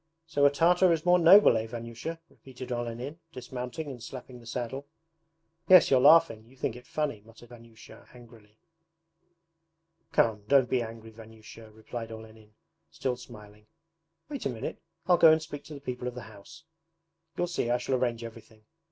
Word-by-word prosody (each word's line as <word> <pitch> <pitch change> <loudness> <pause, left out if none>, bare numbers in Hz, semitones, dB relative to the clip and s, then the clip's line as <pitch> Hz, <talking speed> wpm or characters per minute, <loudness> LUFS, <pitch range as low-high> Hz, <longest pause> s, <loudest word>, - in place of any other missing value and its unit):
'So 145 -3 +3
a - - +5
Tartar 175 +5 +3
is 165 0 -1
more 180 0 +5
noble, 180 - +7
eh, 110 0 -3
Vanyusha?' 115 +7 -7
repeated 130 -1 -11
Olenin, 120 +5 -5
dismounting 125 +4 -6
and 125 -3 -10
slapping 125 +1 -10
the 115 - -15
saddle. 125 +4 -5 0.8
'Yes, 185 -5 +7
you're 130 - +5
laughing! 120 -8 +5
You 130 +2 -21
think 120 - -3
it 125 - -13
funny,' 145 -8 -3
muttered 115 +1 -17
Vanyusha 115 -2 -15
angrily. 115 -3 -17 1.5
'Come, 105 -3 +1
don't 135 -1 +4
be 125 -1 0
angry, 115 -1 -8
Vanyusha,' 110 0 -14
replied 115 +1 -8
Olenin, 110 -1 -13 0.3
still 130 -2 -3
smiling. 105 -3 -14 0.6
'Wait 285 -3 -6
a - - -3
minute, 115 -3 -6 0.2
I'll 180 -1 +4
go 165 -1 +7
and 160 - +4
speak 155 -2 -9
to 155 - -10
the - - -9
people 125 -2 -5
of 125 - -5
the 125 - -7
house; 115 +10 -14 0.7
you'll 175 - +1
see 175 -9 -2
I 120 - +2
shall 125 +2 -3
arrange 120 -2 -1
everything. 110 -1 -12
120 Hz, 170 wpm, -28 LUFS, 115-145 Hz, 1.5 s, noble